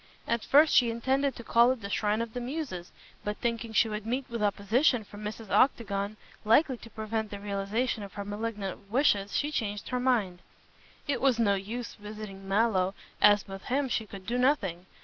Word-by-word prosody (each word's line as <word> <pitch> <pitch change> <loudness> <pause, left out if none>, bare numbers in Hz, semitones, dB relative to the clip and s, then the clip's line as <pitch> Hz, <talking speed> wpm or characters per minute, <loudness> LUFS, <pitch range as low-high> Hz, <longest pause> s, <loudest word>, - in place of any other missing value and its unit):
At 235 -1 0
first 300 +3 +5
she 240 -2 +5
intended 265 +4 0
to 240 - -9
call 235 +2 +5
at 260 -3 -3
the 200 - -5
"Shrine 215 +2 +1
of 230 -1 -8
the 245 - -4
Muses," 250 - -5 0.3
but 210 0 -3
thinking 230 -1 -2
she 220 +1 +4
would 210 -1 -4
meet 255 +3 -1
with 235 -2 -3
opposition 220 +5 +2
from 205 +1 -11
Mrs. 215 0 -6
Octagon, 210 -5 +2 0.3
likely 260 +5 +4
to 230 - -12
prevent 220 0 -3
the 205 - -7
realization 205 +4 -1
of 200 -2 -8
her 200 - -5
malignant 205 -2 -5
wishes, 205 -5 +2
she 295 +1 0
changed 205 -7 -3
her 250 - -1
mind. 225 -9 +1 0.7
It 285 - 0
was 265 -3 +3
no 215 -4 +3
use 220 +5 -4
visiting 210 -2 -9
Mallow, 195 -2 +2 0.3
as 205 -1 +6
with 195 0 -8
him 270 +2 0
she 220 -2 -1
could 195 -2 -10
do 245 +4 -1
nothing. 195 - +1
220 Hz, 190 wpm, -29 LUFS, 200-245 Hz, 0.7 s, as